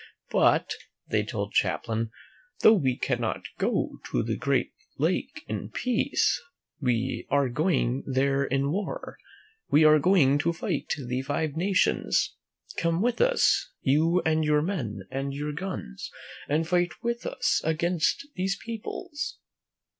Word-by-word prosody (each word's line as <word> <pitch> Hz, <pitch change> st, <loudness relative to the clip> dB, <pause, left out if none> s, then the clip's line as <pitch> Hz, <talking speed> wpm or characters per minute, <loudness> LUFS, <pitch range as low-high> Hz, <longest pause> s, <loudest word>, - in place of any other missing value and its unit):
" -, -, -39 dB
But," -, -, +3 dB, 0.4 s
they 110 Hz, -, +2 dB
told 105 Hz, -1 st, -4 dB
Champlain, 115 Hz, 0 st, 0 dB, 0.5 s
"though 220 Hz, -, +8 dB
we 135 Hz, -, +1 dB
cannot 120 Hz, -4 st, -1 dB, 0.2 s
go -, -, 0 dB
to -, -, 0 dB
the -, -, -1 dB
great -, -, 0 dB, 0.2 s
lake -, -, -1 dB
in 105 Hz, -1 st, -4 dB
peace, 245 Hz, -, +1 dB, 0.4 s
we 125 Hz, -2 st, -1 dB
are 140 Hz, -2 st, +2 dB
going 135 Hz, -2 st, +1 dB
there 135 Hz, +1 st, +2 dB
in 140 Hz, +1 st, 0 dB
war. 200 Hz, +4 st, -4 dB, 0.5 s
We 155 Hz, -, +5 dB
are 155 Hz, 0 st, +7 dB
going 145 Hz, -5 st, +4 dB
to 170 Hz, +3 st, +1 dB
fight 165 Hz, -, -3 dB
the 125 Hz, -2 st, -3 dB
Five 145 Hz, +2 st, -2 dB
Nations. 185 Hz, +3 st, +1 dB, 0.4 s
Come 170 Hz, +3 st, +1 dB
with 245 Hz, 0 st, +1 dB
us, -, -, +3 dB
you 160 Hz, +6 st, +3 dB
and 160 Hz, 0 st, +2 dB
your 150 Hz, 0 st, +3 dB
men 120 Hz, -, -3 dB
and 135 Hz, +1 st, -3 dB
your 150 Hz, +1 st, -3 dB
guns, 170 Hz, -, -5 dB, 0.4 s
and 160 Hz, +3 st, +1 dB
fight 175 Hz, 0 st, 0 dB
with 235 Hz, 0 st, -2 dB
us 125 Hz, 0 st, +1 dB
against 170 Hz, -, +1 dB
these 190 Hz, +2 st, 0 dB
peoples." 235 Hz, +8 st, -5 dB
150 Hz, 140 wpm, -27 LUFS, 130-180 Hz, 0.5 s, though